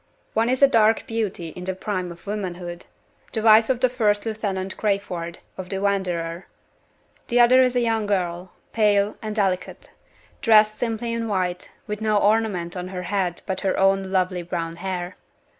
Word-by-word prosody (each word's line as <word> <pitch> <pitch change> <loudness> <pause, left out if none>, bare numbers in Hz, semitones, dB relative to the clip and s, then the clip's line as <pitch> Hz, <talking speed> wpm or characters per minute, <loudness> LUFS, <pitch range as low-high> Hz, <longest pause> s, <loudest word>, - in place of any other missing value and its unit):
One 225 +2 +2
is 260 +2 +1
a - - +10
dark 225 -4 +3
beauty 210 -7 -3
in 180 +2 -9
the 190 0 -2
prime 185 -2 -3
of 170 0 -13
womanhood 180 -4 -5 0.5
the 220 - 0
wife 220 +1 +6
of 255 -1 0
First 210 -4 +1
Lieutenant 200 -4 -3
Crayford, 180 -5 -2 0.2
of 185 -1 -6
the 195 - -3
Wanderer. 180 -4 -2 0.8
The 245 - +2
other 250 +2 +7
is 255 -1 +2
a 245 - +3
young 225 -2 0
girl, 180 -2 -2 0.2
pale 210 -2 +2
and 215 -2 -4
delicate; 190 -4 -2 0.5
dressed 215 -2 +5
simply 230 0 -2
in 230 0 -2
white; 180 -3 -2 0.2
with 210 0 -5
no 215 -1 +2
ornament 205 -5 +1
on 180 0 -4
her 185 -1 -5
head 180 -2 -2
but 190 -1 -3
her 190 - 0
own 195 0 +2
lovely 185 -1 0
brown 170 -1 -4
hair. 180 -1 -4
200 Hz, 170 wpm, -23 LUFS, 180-220 Hz, 0.8 s, a